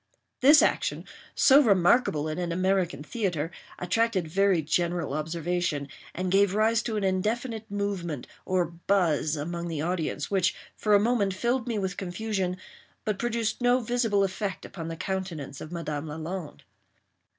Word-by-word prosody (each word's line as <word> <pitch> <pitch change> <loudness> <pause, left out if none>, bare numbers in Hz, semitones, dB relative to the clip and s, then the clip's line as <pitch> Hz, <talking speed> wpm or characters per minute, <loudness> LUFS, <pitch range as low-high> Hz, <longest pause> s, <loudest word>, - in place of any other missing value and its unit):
This 290 +4 +7
action, - - 0 0.3
so 275 +1 +7
remarkable 190 - +3
in 155 +2 -3
an 175 -1 -2
American 185 -4 0
theatre, 170 -4 -2 0.3
attracted 190 -1 0
very 190 0 +2
general 170 -1 0
observation, 160 -1 -2 0.3
and 185 +1 -2
gave 195 0 +4
rise 220 +1 +3
to 220 -2 -3
an 205 - -1
indefinite 220 +4 -1
movement, 195 -8 -3 0.2
or 185 -1 +1
buzz, 170 -3 +1
among 170 +3 -4
the 160 -3 -3
audience, 160 -4 -2
which 190 -2 +2 0.2
for 210 -1 +3
a - - +6
moment 205 -3 +1
filled 240 +4 0
me 230 -3 -1
with 190 -2 -2
confusion, 190 -1 -2 0.5
but 210 -3 -1
produced 235 -1 -1
no 245 +1 +4
visible 230 -4 +1
effect 195 0 -3
upon 165 -4 -7
the 165 - -4
countenance 170 -8 -4
of 155 - -8
Madame 155 -3 -4
Lalande. 160 +2 -6
185 Hz, 150 wpm, -27 LUFS, 165-210 Hz, 0.5 s, This